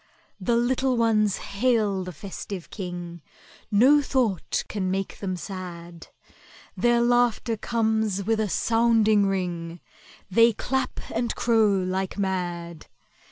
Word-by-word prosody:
The 220 +5 +1
little 255 +2 +1
ones 215 -3 +2
hail 210 -3 0
the 180 - -6
festive 190 +2 -8
King,— 175 -3 -6 0.5
No 260 +8 +5
thought 250 - 0
can 190 -3 -2
make 195 +1 -3
them 190 -2 -3
sad. 175 -3 -8 0.7
Their 240 0 +3
laughter 240 -1 +2
comes 220 -3 0
with 220 +2 0
a 215 -2 0
sounding 225 -2 +3
ring, 175 -3 -3 0.5
They 230 +4 +5
clap 265 +5 -2
and 230 +1 -1
crow 225 -3 +3
like 185 +1 -2
mad! 175 -4 -3
205 Hz, 115 wpm, -25 LUFS, 185-235 Hz, 0.7 s, No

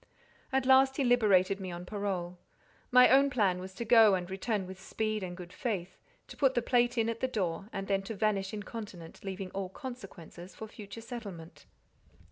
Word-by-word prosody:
And 265 -1 +1
at - - -2
last 265 0 +5
he 280 - +1
liberated 205 -6 +4
me 190 -1 -5
on 175 +1 -7
parole. 180 -3 -3 0.5
My 250 0 +8
own 275 +2 +6
plan 200 -8 +1
was 185 +1 -8
to 235 - -4
go 220 -3 +7
and 180 -1 -3
return 195 +1 -2
with 190 +1 -10
speed 215 +2 -2
and 180 -1 -6
good 180 -1 -10
faith, 190 -7 -4 0.3
to - - -10
put 270 -2 +2
the 240 - +1
plate 245 0 +2
in 225 -1 +2
at 230 0 -2
the 260 - 0
door, 195 -4 -2
and 195 0 -4
then 195 -1 +1
to 225 - -3
vanish 195 -2 0
incontinent, 205 -5 -8
leaving 190 -1 -5
all 195 -1 -4
consequences 190 - -10
for 220 - -7
future 210 0 -10
settlement. 205 -9 -9
205 Hz, 195 wpm, -31 LUFS, 185-240 Hz, 0.5 s, My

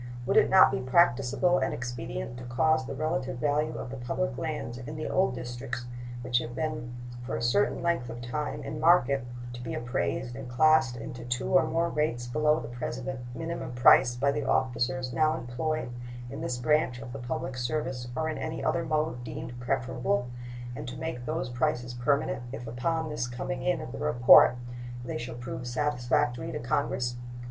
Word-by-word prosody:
Would - - +1
it - - +6
not 190 -7 +8
be 130 - -1
practicable 140 +4 +3
and - - 0
expedient 120 - -5
to - - -8
cause 130 +3 +2
the 135 - -4
relative 135 -4 -1
value 150 +3 +1
of 125 - -6
the 135 - -5
public 135 +1 -2
lands 135 -4 -4
in 140 +5 -7
the 155 - -3
old 185 -8 +2
districts 120 0 -5 0.4
which 120 0 +2
have 120 0 -6
been 150 -5 -3 0.3
for 125 - -3
a 115 - -3
certain 145 +13 +2
length 170 -8 0
of 120 0 -6
time 130 +5 -3
in 150 - -5
market 140 -5 +4 0.3
to 120 - -7
be 120 - -4
appraised 120 0 -2
and 130 -1 -7
classed 135 -1 +4
into 120 +1 -7
two 120 +1 -2
or 135 - +5
more 165 +1 +1
rates 150 -7 0
below 150 +5 +2
the 115 - -6
present 125 +2 -4 0.2
minimum 165 -5 -4
price 125 0 +6
by 140 +3 +2
the 145 0 -2
officers 130 0 0
now 155 +2 +3
employed 130 +3 -2 0.4
in 140 +3 -6
this 145 -7 -2
branch 125 0 +2
of 120 +1 -8
the 140 - -5
public 130 +1 -3
service 125 -1 -2
or 160 +4 0
in 155 - -3
any 160 0 -3
other 170 - +1
mode 155 -6 -1
deemed 120 0 -6
preferable, 125 -1 0 0.5
and - - -6
to 125 +1 -6
make 130 -5 -4
those 160 -1 -1
prices 125 -1 0
permanent 135 +1 +1
if 120 +1 -6
upon 160 +8 -1
the 135 -5 -2
coming 135 +1 -3
in 135 +1 +1
of 120 - -6
the - - -6
report 125 -4 +7 0.5
they - - -3
shall 120 0 -5
prove 120 0 -6
satisfactory 125 -1 0
to - - -3
Congress? 120 0 -1
130 Hz, 185 wpm, -29 LUFS, 120-150 Hz, 0.5 s, not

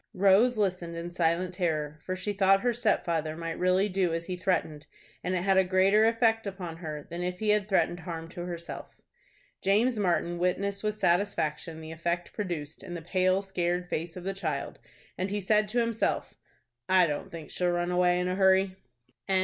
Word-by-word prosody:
Rose 200 +6 +4
listened 180 -4 -1
in 170 +1 -5
silent 175 +1 0
terror, 155 -5 -1
for 185 - -3
she 185 +3 -3
thought 195 0 +4
her 245 -1 +1
stepfather 160 -8 0
might 165 -1 -4
really 185 +2 +3
do 185 -4 0
as 165 0 -4
he 185 - -3
threatened, 175 -5 -1 0.4
and 180 +1 -1
it 180 - -1
had 195 0 +3
a 190 - +6
greater 190 +4 +4
effect 225 -1 +2
upon 180 -4 -6
her 155 -3 -6
than 170 +1 -4
if 180 0 -2
he 215 +2 -1
had 210 -1 +2
threatened 180 -2 +2
harm 165 -2 -6
to 175 +1 -6
herself. 170 -1 -7 0.7
James 215 +4 +2
Martin 175 -2 0
witnessed 200 +3 0
with 210 0 0
satisfaction 170 -4 0
the 160 0 -8
effect 170 +2 -3
produced 165 -7 -4
in 180 -2 -7
the 170 - -5
pale, 185 +2 +2
scared 180 -2 -1
face 165 +1 -3
of 180 - -7
the 195 +1 -2
child, 155 -8 -4 0.4
and 185 +2 -1
he 205 +1 -1
said 210 +2 +2
to 225 +4 -3
himself, 230 -2 0 0.6
"I 185 -1 +6
don't 150 +4 -3
think 165 -3 -8
she'll 180 -1 0
run 175 0 0
away 180 0 +3
in 180 - 0
a 180 - 0
hurry." 190 0 +3 0.5
CHAPTER - - 0
XV. 190 - +4
180 Hz, 200 wpm, -29 LUFS, 170-195 Hz, 0.7 s, a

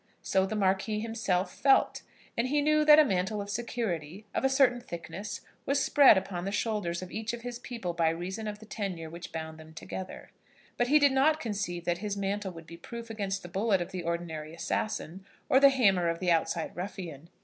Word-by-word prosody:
So 190 0 +2
the 215 - -3
Marquis 195 +2 +1
himself 215 -5 -1
felt; 275 -1 +3 0.3
and 235 +2 +1
he 295 +3 +2
knew 305 +1 +3
that 300 0 +9
a 310 - +7
mantle 195 -1 0
of 200 0 -5
security, 205 -6 -3
of - - -1
a 270 - +4
certain 265 -3 +3
thickness, 190 0 -7 0.3
was 280 +1 +2
spread 270 -4 +6
upon 185 -2 -3
the 195 - -2
shoulders 200 -5 -1
of 185 - -9
each 220 +2 -3
of 235 -1 -6
his 245 -1 -5
people 230 -8 -5
by 165 -1 +2
reason 185 +6 -4
of 210 0 -4
the 220 - -13
tenure 185 -7 -5
which 170 +1 -8
bound 160 -1 -6
them 160 0 -13
together. 185 +3 -7 0.4
But 245 - +1
he 295 +4 +6
did 285 -2 +5
not 295 +4 +3
conceive 195 - -3
that 175 +1 -1
this 205 -1 -3
mantle 200 0 -2
would 165 -1 -11
be 170 +1 -11
proof 230 +6 -8
against 200 -3 -3
the - - -7
bullet 195 +2 +1
of 175 - -4
the 185 - -4
ordinary 165 -2 -4
assassin, 190 0 -3 0.2
or 265 - +5
the 280 0 +8
hammer 195 -10 +3
of 165 - -1
the 180 0 +1
outside 165 0 0
ruffian. 175 -4 -6
195 Hz, 210 wpm, -29 LUFS, 175-235 Hz, 0.4 s, that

